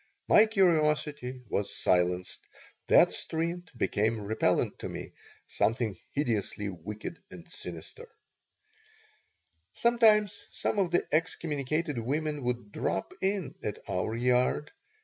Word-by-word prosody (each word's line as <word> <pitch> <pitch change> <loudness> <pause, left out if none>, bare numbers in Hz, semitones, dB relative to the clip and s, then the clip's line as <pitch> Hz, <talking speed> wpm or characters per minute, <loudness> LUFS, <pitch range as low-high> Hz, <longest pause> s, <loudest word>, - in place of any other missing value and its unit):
My 215 +1 +7
curiosity 150 - +1
was 100 -1 -1
silenced. 90 0 +1 0.5
That - - +6
street 170 +1 -3
became 110 0 +1
repellent 105 +2 0
to - - -5
me, - - -7 0.3
something 110 -2 0 0.2
hideously 110 -7 -1
wicked 105 - -7
and - - -12
sinister 475 0 -9 1.6
Sometimes 215 -4 +3
some 210 - -2
of 190 -3 +2
the 175 - +1
excommunicated 155 -3 -1
women 150 +5 -1
would 120 -4 -2
drop 95 - -2
in 190 -7 -1
at 105 - -3
our 100 +5 -1
yard. 125 +4 +1
145 Hz, 110 wpm, -29 LUFS, 110-170 Hz, 1.6 s, My